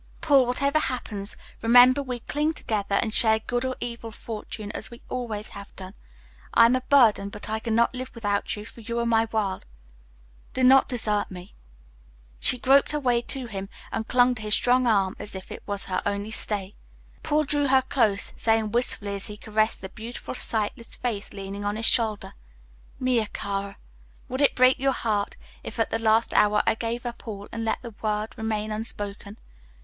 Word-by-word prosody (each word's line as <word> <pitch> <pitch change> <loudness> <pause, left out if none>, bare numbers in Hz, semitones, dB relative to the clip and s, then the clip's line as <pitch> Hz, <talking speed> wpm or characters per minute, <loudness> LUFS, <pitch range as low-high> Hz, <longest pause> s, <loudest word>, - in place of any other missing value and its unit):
"Paul, 280 -6 +4
whatever 280 +4 +1
happens, 215 -8 -3 0.2
remember 245 +4 +7
we 250 -3 -5
cling 300 +5 -1
together 205 -8 -2
and 220 - -3
share 220 -1 +4
good 240 +2 -2
or 260 0 -2
evil 235 -1 -5
fortune 215 -1 -7
as - - -6
we 235 -1 -13
always 225 -4 -4
have 200 -1 -11
done. 185 0 -9 0.6
I 230 - +8
am 240 +2 +4
a 255 - 0
burden, 235 -7 +4
but 210 +1 -9
I 220 - -1
cannot 230 +2 +1
live 255 0 -5
without 205 -3 -1
you, 210 0 -8
for 230 - -13
you 235 +2 -4
are 235 - 0
my 225 -1 +3
world. 205 -4 -1 0.9
Do 260 - +1
not 265 +1 +7
desert 215 -4 0
me." 180 +1 -10 0.9
She 255 - +2
groped 275 +4 +4
her 300 - 0
way 245 -4 +2
to 260 +1 -4
him 195 -4 -6 0.2
and 220 - -3
clung 250 0 +4
to 230 - -7
his 210 0 +4
strong 250 0 +3
arm 195 -4 +2
as 205 - -6
if 190 - -8
it - - -7
was 200 -1 -1
her 185 - -1
only 205 +1 -2
stay. 205 -2 +1 0.5
Paul 305 0 +1
drew 290 -1 +1
her 265 0 +4
close, 225 -7 +1
saying 225 -1 +1
wistfully, 215 -4 +1
as 200 0 -3
he 210 - -8
caressed 215 +1 0
the 190 - -7
beautiful 230 +4 -7
sightless 230 0 -1
face 220 -5 -3
leaning 195 0 -6
on 205 0 -1
his 225 +1 -1
shoulder, 220 -4 +1 0.7
"Mia 250 -4 +1
cara, 200 -1 -4 0.5
would 260 +3 -2
it 285 - +4
break 255 +1 +5
your 270 0 +2
heart, 210 -5 -1 0.2
if - - -8
at 225 - +1
the 225 - 0
last 225 0 +2
hour 210 0 +4
I - - +3
gave 230 +2 -4
up 240 0 -7
all 205 -2 -6
and 230 0 -4
let 225 - -1
the 235 -2 -8
word 215 0 -2
remain 215 -1 -2
unspoken? 205 -1 -5
225 Hz, 190 wpm, -25 LUFS, 210-250 Hz, 0.9 s, I